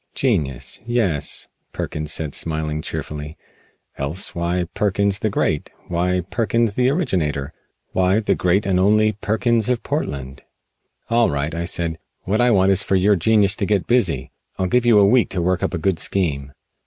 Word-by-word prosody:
"Genius, 70 - -1
yes," 105 -12 -1 0.3
Perkins 75 0 -3
said 75 -3 -2
smiling 80 -1 -2
cheerfully, 75 0 -6 0.6
"else 75 +7 -1
why 85 +1 -1
Perkins 100 -1 +1
the 110 - 0
Great? 75 -6 -1 0.2
Why 90 +1 0
Perkins 115 +3 0
the 125 +4 +2
originator? 80 - -1 0.4
Why 95 +3 +2
the 110 - +1
Great 90 +3 +1
and 95 -2 +1
Only 110 +3 +4
Perkins 110 +2 0
of 125 -2 0
Portland?" 70 -1 -4 0.7
"All 115 0 +4
right," 70 +1 -2
I 85 +1 -3
said, 85 -1 -2 0.2
"what 105 +5 0
I 120 - +4
want 95 -3 +4
is 95 - +4
for 95 - 0
your 100 +2 +4
genius 105 +2 +3
to 100 - 0
get 100 -3 +1
busy. 85 - +1 0.3
I'll 95 - 0
give 120 +6 +1
you 115 -3 +6
a 100 - +6
week 120 +4 +3
to 90 - -2
work 90 0 +1
up - - -1
a - - -1
good 85 +1 0
scheme." 75 -8 -1
95 Hz, 170 wpm, -21 LUFS, 80-105 Hz, 0.7 s, you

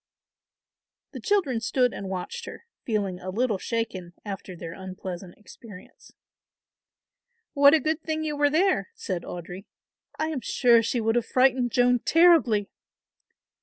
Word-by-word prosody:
The - - -8
children 375 - +1
stood 250 +1 +1
and 195 - -6
watched 195 - -5
her, - - -10 0.2
feeling 200 -5 -2
a 185 - -7
little 220 0 0
shaken 190 -7 -4
after 195 -2 -7
their 165 -1 -8
unpleasant 185 -1 -8
experience. 210 -2 -14 1.4
"What 285 +1 +7
a - - +3
good 315 +1 -1
thing 315 0 -3
you 300 -1 -2
were 290 0 +3
there," 370 +9 +1
said 185 - -4
Audry. 180 +3 -8 0.5
"I 315 - -1
am 295 -5 -3
sure 235 -2 +4
she 230 +2 -1
would 225 0 +1
have 240 -1 0
frightened 255 -1 +2
Joan 245 +1 +3
terribly." 315 - +4
235 Hz, 140 wpm, -26 LUFS, 190-290 Hz, 1.4 s, What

